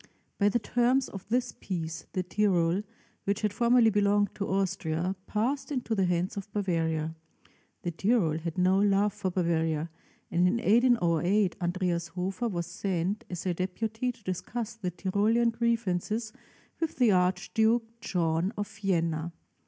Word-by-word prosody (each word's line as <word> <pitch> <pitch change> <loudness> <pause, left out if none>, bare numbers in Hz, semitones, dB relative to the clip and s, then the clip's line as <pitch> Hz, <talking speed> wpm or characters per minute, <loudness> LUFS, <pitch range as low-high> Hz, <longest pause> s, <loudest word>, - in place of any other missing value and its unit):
By 205 0 +4
the 240 - +2
terms 245 +3 +2
of 195 0 -9
this 245 +1 +1
peace, 165 -3 -4
the 185 - 0
Tyrol, 180 -2 +2 0.4
which 200 +1 0
had 210 -2 0
formerly 235 +1 +4
belonged 205 0 +2
to 200 - -3
Austria, 185 -2 -1
passed 255 +8 -1
into 250 -5 -1
the 195 -3 +2
hands 180 +1 0
of 200 0 -6
Bavaria. 165 -5 -1 0.7
The 175 - -1
Tyrol 175 -3 +1
had 165 +1 -5
no 185 +1 +4
love 205 0 +3
for 205 -2 -2
Bavaria; 165 -3 0 0.4
and 175 +1 +3
in 180 - +2
1808 210 -5 +3
Andreas 175 -1 0
Hofer 185 +6 -3
was 170 -4 -2
sent 185 +2 -2
as 180 -1 -5
a 180 - +1
deputy 220 +7 -2
to 235 -3 -22
discuss 220 +5 -4
the 215 -5 -4
Tyrolean 210 +6 +1
grievances 225 -2 -1 0.5
with 325 -2 -2
the 245 -4 +4
Archduke 220 +6 +1
John 175 -3 0
of 205 0 -2
Vienna. 170 -6 -1
195 Hz, 145 wpm, -29 LUFS, 175-225 Hz, 0.7 s, By